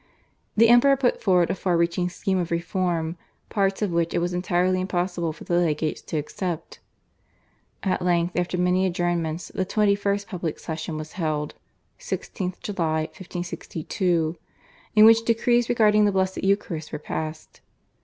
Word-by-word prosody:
The 230 Hz, +2 st, +7 dB
Emperor 245 Hz, +4 st, +6 dB
put 255 Hz, -2 st, +1 dB
forward 180 Hz, -5 st, +3 dB
a -, -, +1 dB
far 180 Hz, -2 st, 0 dB
reaching 170 Hz, +1 st, +1 dB
scheme 190 Hz, +1 st, -1 dB
of 175 Hz, -1 st, -2 dB
reform 170 Hz, -1 st, -1 dB, 0.3 s
parts 195 Hz, 0 st, 0 dB
of 200 Hz, -, 0 dB
which 170 Hz, 0 st, 0 dB
it -, -, +2 dB
was 175 Hz, +1 st, 0 dB
entirely 180 Hz, +1 st, +1 dB
impossible 175 Hz, -2 st, -1 dB
for 155 Hz, -, -11 dB
the 175 Hz, 0 st, +1 dB
legates 155 Hz, -2 st, 0 dB
to 160 Hz, -, -4 dB
accept. 165 Hz, +2 st, -4 dB, 1.0 s
At 190 Hz, -, 0 dB
length 175 Hz, -1 st, +1 dB
after 180 Hz, 0 st, -1 dB
many 180 Hz, +1 st, +2 dB
adjournments 175 Hz, -2 st, -2 dB
the 190 Hz, -, 0 dB
21st 200 Hz, 0 st, +1 dB
public 175 Hz, -6 st, -4 dB
session 155 Hz, -1 st, -5 dB
was 155 Hz, 0 st, -7 dB
held 155 Hz, -5 st, -2 dB, 0.5 s
(16th 185 Hz, -3 st, -4 dB
July 165 Hz, -6 st, -1 dB
1562), 175 Hz, -1 st, -3 dB, 0.6 s
in 215 Hz, 0 st, +8 dB
which 225 Hz, 0 st, +7 dB
decrees 235 Hz, +1 st, +2 dB
regarding 210 Hz, -3 st, +4 dB
the 205 Hz, -, +3 dB
Blessed 190 Hz, -1 st, -1 dB
Eucharist 190 Hz, -6 st, -1 dB
were -, -, -3 dB
passed. 155 Hz, +1 st, -6 dB
180 Hz, 150 wpm, -24 LUFS, 170-195 Hz, 1.0 s, in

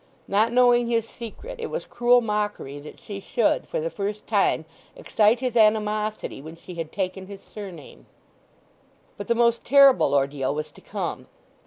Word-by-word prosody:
Not 215 Hz, +4 st, +2 dB
knowing 245 Hz, -1 st, +4 dB
his 230 Hz, -1 st, 0 dB
secret 420 Hz, -, -9 dB
it 460 Hz, -, -3 dB
was -, -, -5 dB
cruel 245 Hz, +1 st, +3 dB
mockery 210 Hz, -, -3 dB
that 150 Hz, +1 st, -12 dB
she 200 Hz, -2 st, -8 dB
should 225 Hz, +3 st, 0 dB
for -, -, -3 dB
the 165 Hz, +1 st, -3 dB
first 205 Hz, +1 st, -4 dB
time 200 Hz, -6 st, +1 dB, 0.3 s
excite 220 Hz, +3 st, +2 dB
his 250 Hz, -2 st, -2 dB
animosity 215 Hz, -, +1 dB
when 160 Hz, +3 st, -10 dB
she 180 Hz, +2 st, -11 dB
had 165 Hz, -2 st, -6 dB
taken 190 Hz, -1 st, -4 dB
his 200 Hz, -1 st, -11 dB
surname. 190 Hz, -8 st, -11 dB, 1.1 s
But 205 Hz, -, -8 dB
the 235 Hz, -, +2 dB
most 235 Hz, 0 st, +2 dB
terrible 275 Hz, -, +5 dB
ordeal 140 Hz, 0 st, 0 dB
was 150 Hz, 0 st, -4 dB
to -, -, -17 dB
come. -, -, -5 dB
210 Hz, 165 wpm, -24 LUFS, 175-235 Hz, 1.1 s, terrible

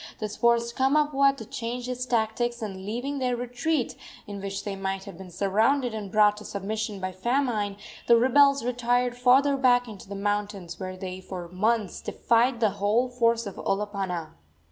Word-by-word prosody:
This 210 Hz, -1 st, -4 dB
forced 235 Hz, 0 st, +2 dB
Kamapuaa 275 Hz, 0 st, +3 dB
to 225 Hz, -, -8 dB
change 240 Hz, +3 st, -5 dB
his 250 Hz, 0 st, -4 dB
tactics, 235 Hz, 0 st, 0 dB
and, 190 Hz, -2 st, -6 dB
leaving 260 Hz, +6 st, -3 dB
their 250 Hz, -1 st, 0 dB
retreat, 245 Hz, +4 st, -1 dB, 0.3 s
in 200 Hz, -1 st, -7 dB
which 195 Hz, 0 st, -4 dB
they 200 Hz, -1 st, -4 dB
might 195 Hz, 0 st, -3 dB
have 200 Hz, -1 st, -10 dB
been 190 Hz, -1 st, -10 dB
surrounded 220 Hz, +8 st, +1 dB
and 205 Hz, -3 st, -5 dB
brought 210 Hz, -1 st, +4 dB
to 210 Hz, -, -9 dB
submission 210 Hz, +1 st, -4 dB
by 185 Hz, 0 st, -3 dB
famine, 215 Hz, -1 st, -1 dB, 0.3 s
the 235 Hz, -, +7 dB
rebels 275 Hz, +2 st, +4 dB
retired 245 Hz, 0 st, +1 dB
farther 265 Hz, +3 st, +4 dB
back 245 Hz, -2 st, +3 dB
into 205 Hz, -3 st, -11 dB
the 200 Hz, -, -5 dB
mountains, 205 Hz, -3 st, -3 dB
where 185 Hz, 0 st, -5 dB
they 185 Hz, 0 st, -6 dB
for 180 Hz, -2 st, -7 dB
months 210 Hz, +2 st, 0 dB
defied 235 Hz, +1 st, +1 dB
the 215 Hz, -3 st, +3 dB
whole 225 Hz, +5 st, +2 dB
force 235 Hz, -2 st, +1 dB
of 200 Hz, -, -7 dB
Olopana. 195 Hz, -5 st, -2 dB
225 Hz, 170 wpm, -26 LUFS, 200-245 Hz, 0.3 s, the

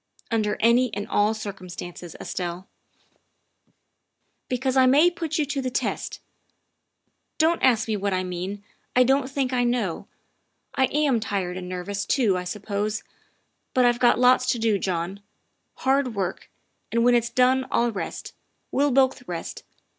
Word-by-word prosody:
" -, -, -30 dB
Under 215 Hz, -2 st, 0 dB
any 235 Hz, +2 st, +4 dB
and 205 Hz, +1 st, -4 dB
all 210 Hz, +1 st, +2 dB
circumstances, 180 Hz, -4 st, -8 dB
Estelle." 180 Hz, +1 st, -5 dB, 0.9 s
" -, -, -47 dB
Because 260 Hz, +1 st, -1 dB
I 260 Hz, -1 st, +5 dB
may 300 Hz, +7 st, +5 dB
put 325 Hz, -3 st, -3 dB
you 305 Hz, -, +1 dB
to 280 Hz, -1 st, -2 dB
the 260 Hz, -, -2 dB
test. -, -, -3 dB, 1.2 s
Don't 330 Hz, +1 st, +2 dB
ask 235 Hz, -4 st, +3 dB
me 220 Hz, -, 0 dB
what 200 Hz, 0 st, -1 dB
I 185 Hz, 0 st, 0 dB
mean 185 Hz, +3 st, -5 dB, 0.3 s
I 250 Hz, -, +6 dB
don't 265 Hz, +1 st, +2 dB
think 265 Hz, -2 st, -1 dB
I 245 Hz, -1 st, +2 dB
know. 240 Hz, -8 st, -1 dB, 0.7 s
I 265 Hz, -, +3 dB
am 285 Hz, -4 st, +1 dB
tired 195 Hz, -4 st, -2 dB
and 180 Hz, -1 st, -6 dB
nervous 195 Hz, +2 st, -3 dB
too, 220 Hz, -4 st, +2 dB
I 180 Hz, 0 st, -3 dB
suppose, 210 Hz, +2 st, -3 dB, 0.7 s
but 255 Hz, -1 st, +5 dB
I've 240 Hz, 0 st, +3 dB
got 245 Hz, -, +4 dB
lots 250 Hz, +1 st, +4 dB
to -, -, -4 dB
do, 220 Hz, -3 st, +1 dB
John, 185 Hz, +1 st, -2 dB, 0.6 s
hard 265 Hz, -3 st, +1 dB
work, 190 Hz, -2 st, -3 dB, 0.4 s
and 235 Hz, 0 st, +2 dB
when 245 Hz, -, +5 dB
it's 235 Hz, -1 st, +2 dB
done 255 Hz, +1 st, +2 dB
I'll 235 Hz, 0 st, +1 dB
rest. 200 Hz, -, -6 dB, 0.4 s
We'll 285 Hz, +2 st, +2 dB
both 260 Hz, -1 st, +2 dB
rest. 170 Hz, -2 st, -6 dB
230 Hz, 160 wpm, -24 LUFS, 195-260 Hz, 1.2 s, I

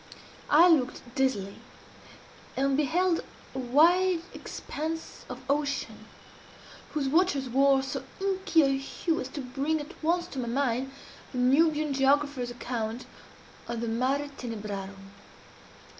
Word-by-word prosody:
I 325 Hz, +4 st, +7 dB
looked 290 Hz, -8 st, +2 dB
dizzily, 250 Hz, -8 st, 0 dB, 1.0 s
and 275 Hz, 0 st, +2 dB
beheld 330 Hz, +5 st, +2 dB, 0.3 s
a 265 Hz, -, -4 dB
wide 335 Hz, +7 st, +4 dB
expanse 320 Hz, +2 st, -6 dB
of -, -, -7 dB
ocean, 285 Hz, 0 st, -2 dB, 0.9 s
whose 285 Hz, -3 st, 0 dB
waters 290 Hz, -3 st, +2 dB
wore 270 Hz, +2 st, +4 dB
so 270 Hz, 0 st, -4 dB, 0.2 s
inky 385 Hz, -4 st, +2 dB
a 275 Hz, -1 st, +3 dB
hue 320 Hz, +4 st, -2 dB
as 255 Hz, -, -4 dB
to 280 Hz, +2 st, -6 dB
bring 275 Hz, +5 st, -1 dB
at 295 Hz, -, -8 dB
once 345 Hz, +2 st, +2 dB
to 270 Hz, -, -5 dB
my 240 Hz, -, -2 dB
mind 260 Hz, +1 st, 0 dB, 0.4 s
the 255 Hz, -, -6 dB
Nubian 300 Hz, +4 st, +3 dB
geographer's 275 Hz, -1 st, +2 dB
account 240 Hz, -1 st, -4 dB, 0.6 s
of 235 Hz, -1 st, -3 dB
the 235 Hz, -, -2 dB
Mare 265 Hz, +5 st, 0 dB
Tenebrarum. 200 Hz, -4 st, -6 dB
275 Hz, 125 wpm, -28 LUFS, 250-310 Hz, 1.0 s, I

